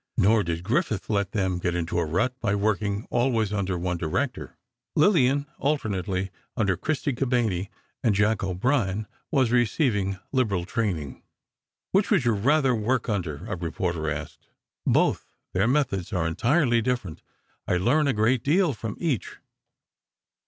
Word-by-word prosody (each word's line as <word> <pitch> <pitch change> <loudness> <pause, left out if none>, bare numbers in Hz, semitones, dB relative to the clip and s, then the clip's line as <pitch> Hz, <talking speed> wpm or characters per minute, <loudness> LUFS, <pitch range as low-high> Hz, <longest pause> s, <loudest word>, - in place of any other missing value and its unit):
Nor 110 +3 +4
did 85 0 -3
Griffith 110 0 -1
let 100 -1 0
them 95 -5 0
get 90 -1 -1
into 85 0 -1
a 85 - +1
rut 90 +11 +1
by 105 -3 0
working 100 0 0
always 120 -4 +1
under 95 -3 -1
one 90 0 -2
director. 120 - -3 0.4
Lillian, 145 -5 +4
alternately 95 -9 -1 0.3
under 100 -5 +2
Christy 150 - -1
Cabanné 120 -7 0 0.3
and 110 -5 +3
Jack 105 0 +2
O'Brien, 100 +2 0 0.2
was 130 -6 +2
receiving 110 - +1
liberal 105 -10 +1
training. 90 - -2 0.7
"Which 195 +1 +2
would 190 - +3
you 120 - +4
rather 135 +5 +3
work 120 +2 0
under?" 85 -9 -2
a - - -3
reporter 85 -1 -2
asked. 75 -1 -6 0.4
"Both. - - +1 0.2
Their 95 +4 +2
methods 125 -9 0
are 90 -4 0
entirely 120 - +2
different; 120 -9 -2 0.5
I 90 - +2
learn 140 - +2
a 140 - +2
great 110 +3 +2
deal 165 +1 +3
from 110 -2 -6
each." 145 - -2
105 Hz, 145 wpm, -26 LUFS, 95-130 Hz, 0.7 s, Nor